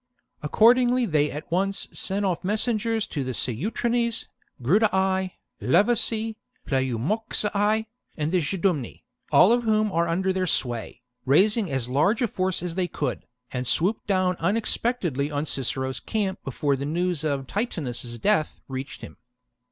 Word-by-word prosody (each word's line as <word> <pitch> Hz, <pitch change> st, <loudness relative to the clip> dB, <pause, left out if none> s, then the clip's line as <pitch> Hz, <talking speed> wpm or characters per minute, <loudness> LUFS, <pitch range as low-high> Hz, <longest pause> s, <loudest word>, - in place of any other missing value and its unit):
Accordingly 245 Hz, +9 st, +4 dB
they 150 Hz, -6 st, +2 dB
at 150 Hz, +3 st, -8 dB
once 195 Hz, +3 st, 0 dB
sent 200 Hz, +1 st, 0 dB
off 180 Hz, -2 st, -1 dB
mes 210 Hz, +4 st, +1 dB
sengers 225 Hz, -2 st, 0 dB
to 145 Hz, -, -2 dB
the 130 Hz, -1 st, -3 dB
Ceutrones, 230 Hz, -, 0 dB, 0.3 s
Grudii, 190 Hz, -, +2 dB, 0.3 s
Levaci, 220 Hz, +2 st, +2 dB, 0.3 s
Pleu 130 Hz, -3 st, 0 dB
moxii, 210 Hz, -, 0 dB, 0.3 s
and 155 Hz, 0 st, -1 dB
Geidumni, 170 Hz, -, -1 dB, 0.3 s
all 195 Hz, -, +7 dB
of 240 Hz, +1 st, +3 dB
whom 215 Hz, -2 st, +1 dB
are 170 Hz, -1 st, +1 dB
under 190 Hz, +3 st, 0 dB
their 185 Hz, -1 st, -1 dB
sway, 120 Hz, -5 st, -1 dB, 0.2 s
raised 195 Hz, -, +4 dB
as 135 Hz, -, -2 dB
large 155 Hz, -, +2 dB
a -, -, +3 dB
force 185 Hz, -3 st, -1 dB
as 175 Hz, -2 st, -3 dB
they 180 Hz, 0 st, -1 dB
could, -, -, -4 dB, 0.2 s
and 125 Hz, -1 st, -3 dB
swooped 190 Hz, -, +1 dB
down 185 Hz, -2 st, +1 dB
unexpectedly 190 Hz, -, -1 dB
upon 145 Hz, 0 st, -2 dB
Cicero's 130 Hz, -2 st, -2 dB
camp 200 Hz, -, -2 dB
before 140 Hz, +1 st, 0 dB
the 140 Hz, +1 st, -4 dB
news 175 Hz, 0 st, -1 dB
of 140 Hz, -3 st, -1 dB
Titunus's 130 Hz, -, -3 dB
death 155 Hz, -, +1 dB
reached 135 Hz, 0 st, -6 dB
him. -, -, -10 dB
185 Hz, 145 wpm, -25 LUFS, 145-215 Hz, 0.3 s, all